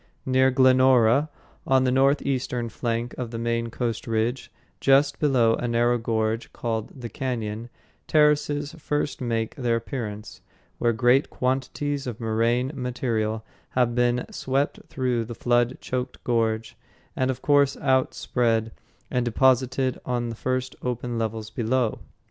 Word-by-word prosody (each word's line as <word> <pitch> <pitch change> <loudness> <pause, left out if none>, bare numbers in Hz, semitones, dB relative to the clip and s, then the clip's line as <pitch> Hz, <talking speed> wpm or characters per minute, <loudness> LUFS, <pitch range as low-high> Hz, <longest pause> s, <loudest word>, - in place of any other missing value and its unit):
Near 130 0 +4
Glenora, 130 +1 +4 0.4
on 130 -1 +4
the 130 - +2
northeastern 130 -3 +1
flank 115 +1 -2
of 125 -2 -3
the 115 - -5
main 115 0 -1
Coast 115 -1 -3
Range, 115 +3 -1 0.3
just 140 +1 +3
below 125 -6 +3
a 120 - -2
narrow 120 +1 +2
gorge 110 0 -1
called 115 +2 -4
"The 120 - -4
Cañon," 115 -2 -4 0.4
terraces 150 -1 +2
first 150 -1 -2
make 115 -2 -1
their 120 -3 0
appearance, 110 -4 -5 0.4
where 120 - +3
great 120 +4 +3
quantities 135 +2 -2
of 115 -3 -5
moraine 115 +3 +1
material 115 -4 -2 0.3
have 120 -2 +3
been 120 0 +1
swept 135 +2 -1
through 125 -3 -1
the 115 +1 -7
flood 120 +1 +1
choked 125 0 -4
gorge 115 -2 0 0.4
and 130 0 0
of 130 - -3
course 140 -1 +3
outspread 120 -4 +1 0.4
and 125 -2 +1
deposited 130 +1 +2
on 120 -1 -2
the 115 - -5
first 130 +2 -2
open 120 -1 -3
levels 110 -1 -3
below. 120 0 0
125 Hz, 135 wpm, -25 LUFS, 115-130 Hz, 0.4 s, Near